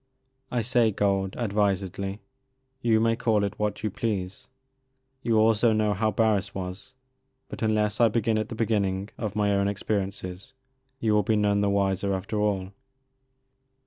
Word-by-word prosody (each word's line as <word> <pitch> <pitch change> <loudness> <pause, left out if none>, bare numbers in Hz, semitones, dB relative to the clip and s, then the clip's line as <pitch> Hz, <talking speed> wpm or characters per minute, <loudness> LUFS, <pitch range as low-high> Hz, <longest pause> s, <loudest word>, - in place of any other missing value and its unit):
I 120 -2 -1
say 120 0 +3
gold, 100 -2 0
advisedly. 100 -2 -1 0.6
You 115 -2 +3
may 115 0 +2
call 110 -3 +1
it 100 - -3
what 105 0 -2
you 110 - -1
please. 100 +2 -3 0.7
You 115 -3 +1
also 110 +1 +4
know 105 -1 +2
how 110 +3 +1
Barris 105 -2 +1
was 95 +7 -7 0.3
— 130 0 -37
^but - - -7
unless 110 0 +1
I 115 - +7
begin 110 0 +1
at 110 - -3
the 115 - -5
beginning 100 -3 0
of 105 -2 -3
my 105 -1 +2
own 100 0 +2
experiences 100 +2 -3 0.5
you 110 -2 +1
will 105 - +4
be 110 +2 +1
none 105 -1 +2
the 100 - +2
wiser 100 0 +1
after 100 +3 -3
all. 100 -3 0
105 Hz, 160 wpm, -26 LUFS, 100-110 Hz, 0.7 s, I